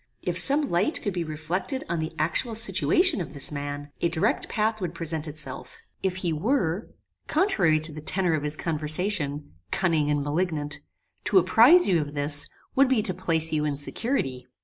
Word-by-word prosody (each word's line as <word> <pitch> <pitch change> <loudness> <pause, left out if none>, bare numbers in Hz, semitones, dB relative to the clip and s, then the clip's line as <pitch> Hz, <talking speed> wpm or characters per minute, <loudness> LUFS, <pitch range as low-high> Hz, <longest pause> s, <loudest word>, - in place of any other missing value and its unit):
If - - -2
some 290 +1 +3
light 185 - +1
could 205 - -2
be 175 -1 -2
reflected 165 - -4
on 170 0 -2
the 160 +1 -3
actual 195 +9 -1
situation 285 - +3
of 155 -2 -7
this 140 - -2
man, 145 0 -6
a 170 - +2
direct 165 -1 -1
path 220 0 -1
would 175 -2 -4
present 165 -2 -4
itself. 150 0 -8 0.2
If 190 -1 -1
he 180 -3 -2
were, 185 - -1 0.4
contrary 200 - +2
to 155 +1 +2
the 155 0 -8
tenor 180 +2 +2
of 155 - 0
his 150 +1 +2
conversation, 155 - 0 0.2
cunning 165 -6 +1
and 145 -1 0
malignant, 145 -1 -2 0.5
to 200 - +3
apprize 235 - +6
you 175 -5 +2
of 145 0 -7
this, 145 0 +2 0.2
would 275 0 +4
be 245 -5 +2
to 190 - -1
place 165 -3 +1
you 150 -1 +1
in 145 -2 -2
security. 140 - -2
165 Hz, 180 wpm, -25 LUFS, 150-200 Hz, 0.5 s, apprize